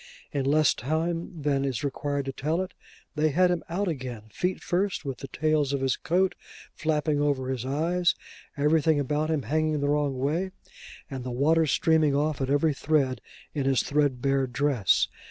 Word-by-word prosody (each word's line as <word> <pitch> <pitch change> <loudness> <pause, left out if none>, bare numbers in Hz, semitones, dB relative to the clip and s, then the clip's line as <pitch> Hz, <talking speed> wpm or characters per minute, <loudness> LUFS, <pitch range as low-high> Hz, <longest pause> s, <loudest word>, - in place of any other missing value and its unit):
In 140 -2 -1
less 150 +1 +4
time 165 +3 -2
than 140 -2 +1
is 135 -3 -2
required 140 0 -2
to 135 - -2
tell 155 +6 -1
it, 185 - -9 0.4
they 155 0 +2
had 180 +5 +3
him 175 -2 -1
out 195 +4 -1
again, 130 -8 -4
feet 180 - -1
first, 185 -2 -1
with 135 -3 -4
the 135 - -7
tails 155 -1 +1
of 140 - -1
his 135 -2 +1
coat 180 +6 +1 0.4
flapping 150 -2 0
over 140 -3 0
his 130 -1 -3
eyes, 170 +5 +1 0.4
everything 155 +1 +3
about 150 +3 0
him 155 -4 0
hanging 155 +5 0
the 145 0 0
wrong 145 -2 +1
way, 165 +8 -1 0.5
and 130 -2 -6
the 130 - -4
water 155 +6 +3
streaming 155 -1 +3
off 150 0 0
at 135 - -1
every 145 +2 +3
thread 140 -3 +1 0.3
in 140 -3 -1
his 135 -2 +3
threadbare 135 -2 +1
dress. 125 - +2
145 Hz, 175 wpm, -27 LUFS, 135-160 Hz, 0.5 s, less